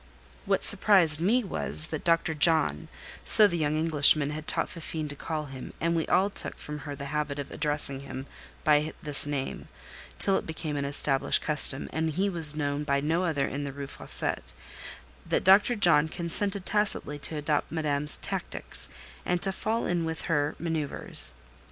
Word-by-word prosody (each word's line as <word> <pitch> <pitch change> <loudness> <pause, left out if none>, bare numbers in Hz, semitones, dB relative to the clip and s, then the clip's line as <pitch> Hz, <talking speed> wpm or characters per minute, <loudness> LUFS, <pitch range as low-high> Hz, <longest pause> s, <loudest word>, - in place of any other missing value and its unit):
What - - 0
surprised 170 -7 +4
me 235 +8 +2
was, 165 -4 0
that 155 - -5
Dr. 165 -1 +1
John 150 - +2 0.4
(so 215 - +8
the 175 -4 0
young 155 -2 -1
Englishman 150 -2 +4
had 155 +1 -8
taught - - +3
Fifine 160 -2 -6
to 145 - -6
call 155 +1 -5
him, 135 -2 -10
and 170 +1 -1
we 165 - -2
all 190 +3 +1
took - - -4
from 150 0 -8
her 145 - -5
the 140 0 -8
habit 150 -1 -3
of 140 -1 -7
addressing 145 -2 -2
him 135 -1 -8 0.4
by 150 +1 +2
this 145 -1 +3
name, 140 -2 -5 0.5
till 195 -1 +3
it - - -6
became 160 -2 -5
an 140 -1 -3
established 140 -1 0
custom, 145 -3 +1
and 160 0 -1
he 195 +5 -1
was 160 -5 +7
known 145 -1 -3
by 140 -1 0
no 165 +5 -1
other 145 -5 -1
in 145 +1 -5
the 140 - -5
Rue 140 +1 -7
Fossette)—that - - -4
Dr. 200 +6 +4
John 170 -7 +4
consented 190 +4 0
tacitly 205 -8 0
to 155 +2 -4
adopt 150 0 -2
Madame's 150 -2 0
tactics, - - -6 0.3
and 180 0 -1
to 195 - +1
fall 220 +4 -3
in 175 -1 -1
with 160 0 -5
her 145 -3 -1
manoeuvres. 155 - +1
155 Hz, 175 wpm, -27 LUFS, 145-170 Hz, 0.5 s, so